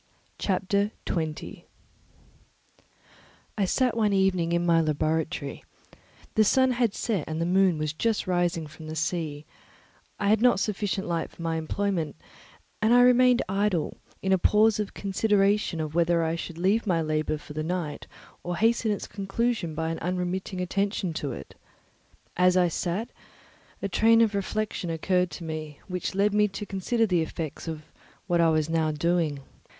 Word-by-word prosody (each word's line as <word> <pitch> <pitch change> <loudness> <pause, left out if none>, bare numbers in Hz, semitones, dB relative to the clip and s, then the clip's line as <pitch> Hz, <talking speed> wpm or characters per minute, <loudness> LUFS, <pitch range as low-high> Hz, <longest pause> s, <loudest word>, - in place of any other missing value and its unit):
Chapter 200 +1 +1 0.2
20 160 -3 -4 1.9
I 200 - +1
sat 250 +5 +1
one 215 -3 +2
evening 185 -3 +2
in 170 0 +1
my 165 -1 +4
laboratory; 155 -1 -1 0.7
the 220 - +4
sun 260 +4 +4
had 240 -4 +1
set, 205 -9 -1
and 155 0 -3
the 165 - 0
moon 185 -1 +3
was 155 0 -2
just 225 +6 0
rising 175 -3 0
from 155 +1 -11
the 155 - -5
sea; 155 -2 -2 0.7
I 200 -1 +1
had 215 +1 +4
not 245 -5 +4
sufficient 200 -1 -1
light 170 -1 -2
for 170 - -11
my 165 -1 -1
employment, 165 -1 -2 0.7
and 225 +2 +4
I 245 - +7
remained 250 0 +5
idle, 195 -3 0 0.3
in 190 - 0
a 190 - +3
pause 215 +3 +4
of 210 -2 -3
consideration 200 -2 +1
of 155 -1 -3
whether 170 0 +2
I 160 0 0
should 170 0 -6
leave 200 +6 +1
my 170 -4 +2
labour 155 0 -1
for 150 - -11
the 155 - -3
night 160 -2 -3 0.3
or 175 0 -4
hasten 225 +3 +2
its 205 - -1
conclusion 195 -3 -2
by 160 +1 -1
an 165 - -4
unremitting 180 +1 -2
attention 195 -1 -1
to 145 - -2
it. 70 - -8 0.8
As 180 0 +4
I 180 -1 +4
sat, 190 +8 -2 0.7
a - - +1
train 225 +4 +4
of 220 -2 +3
reflection 200 -2 -2
occurred 180 +2 +1
to 175 - -8
me 155 -2 -6
which 180 0 -3
led 200 +1 +2
me 210 0 +4
to 205 +1 -6
consider 205 +4 0
the 180 -5 +1
effects 160 0 -5
of 155 -1 -5 0.4
what 175 -2 +2
I 165 - +5
was 155 -1 +1
now 160 -1 +1
doing. 155 -2 0
180 Hz, 165 wpm, -27 LUFS, 160-205 Hz, 1.9 s, I